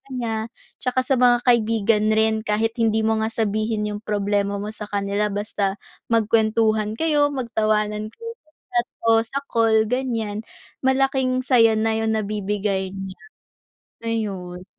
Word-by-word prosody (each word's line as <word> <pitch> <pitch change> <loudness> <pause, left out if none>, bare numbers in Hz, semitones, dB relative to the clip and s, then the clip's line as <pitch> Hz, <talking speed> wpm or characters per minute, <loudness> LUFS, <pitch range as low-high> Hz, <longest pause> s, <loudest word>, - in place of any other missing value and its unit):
niya 225 -3 -2 0.3
tsaka 255 0 0
sa 260 -1 +1
mga 245 -1 +4
kaibigan 225 -3 +2
rin 220 0 +3
kahit 220 +1 0
hindi 220 -1 +2
mo 220 0 +1
nga 220 - 0
sabihin 215 0 -1
yung 205 - -5
problema 205 -1 -1
mo 205 +1 -4
sa 210 -1 -8
kanila, 200 +1 -1
basta 205 -1 -2 0.3
magkuwentuhan 220 -1 +2
kayo, 295 +1 +2
magtawanan 215 -5 -1
kayo, 460 0 -7
sa 310 - -33 0.3
chat 240 - -2 0.2
o - - +7
sa 275 +5 -3
call 220 -1 +3
ganiyan 225 -5 -2 0.4
malaking 265 -1 +2
saya 230 -4 +5
na 220 0 +1
yung 220 0 0
nabibigay 200 -2 -2
niya, 195 -1 -7 0.8
ayun. 195 -6 -4
220 Hz, 140 wpm, -22 LUFS, 210-230 Hz, 0.8 s, o